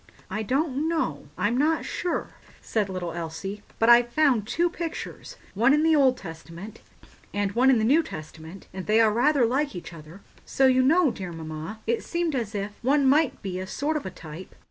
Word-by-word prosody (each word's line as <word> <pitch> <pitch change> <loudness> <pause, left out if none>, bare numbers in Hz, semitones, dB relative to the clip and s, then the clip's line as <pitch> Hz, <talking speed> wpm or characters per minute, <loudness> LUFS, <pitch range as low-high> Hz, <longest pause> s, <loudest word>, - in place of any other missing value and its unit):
"I 215 - -2
don't 275 +5 0
know—I'm 325 -6 -2
not 310 +5 +1
sure," 355 - -3 0.3
said 210 -3 -1
little 180 -2 -4
Elsie; 170 +5 -6 0.2
"but 225 - +2
I've 240 0 +6
found 255 -8 +2
two 345 +8 +1
pictures—one 325 - -2
in 300 - +2
the 320 0 +4
Old 265 -3 +4
Testament 170 +3 -10 0.5
and 205 -1 0
one 250 +5 +3
in 260 - +5
the 220 - +1
New 290 +8 +5
Testament—and 165 - -9
they 215 +1 +4
are 220 -2 +4
rather 260 +2 +3
like 275 +3 0
each 170 -1 -8
other; 165 +4 -12 0.2
so, 270 - +1
you 260 0 +5
know, 305 +2 +4
dear 185 -5 -6
mamma, 160 +6 -7
it 235 +1 0
seemed 340 -2 -1
as 225 -5 -3
if 200 +1 -3
one 275 +3 +2
might 290 +2 +2
be 185 -2 -4
a 185 - -5
sort 295 +9 -2
of 300 - -3
a - - -3
type." 170 0 -11
230 Hz, 190 wpm, -26 LUFS, 190-285 Hz, 0.5 s, I've